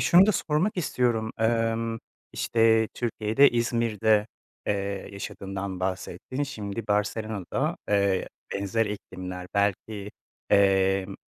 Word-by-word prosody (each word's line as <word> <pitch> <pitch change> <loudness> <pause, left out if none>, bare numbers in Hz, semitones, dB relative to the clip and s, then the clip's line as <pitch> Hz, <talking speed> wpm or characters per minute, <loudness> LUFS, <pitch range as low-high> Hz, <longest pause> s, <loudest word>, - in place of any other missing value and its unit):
şunu 175 +9 +7
da 215 - +4
sormak 170 +4 0
istiyorum. 120 -9 0
Emm, 115 0 +1 0.3
işte, 115 -1 +3
Türkiye'de, 115 +3 +3
İzmir'de, 115 -3 +2 0.4
eee, 100 -1 -2
yaşadığından 95 -1 -5
bahsettin. 95 +7 -3
Şimdi 110 -5 -5
Barcelona'da, 105 -1 -1
eee, 100 -2 +2 0.3
benzer 100 +3 0
iklimler, 90 -3 -6
belki, 100 +1 -1 0.4
emm, 95 -1 +3
105 Hz, 95 wpm, -27 LUFS, 100-115 Hz, 0.4 s, şunu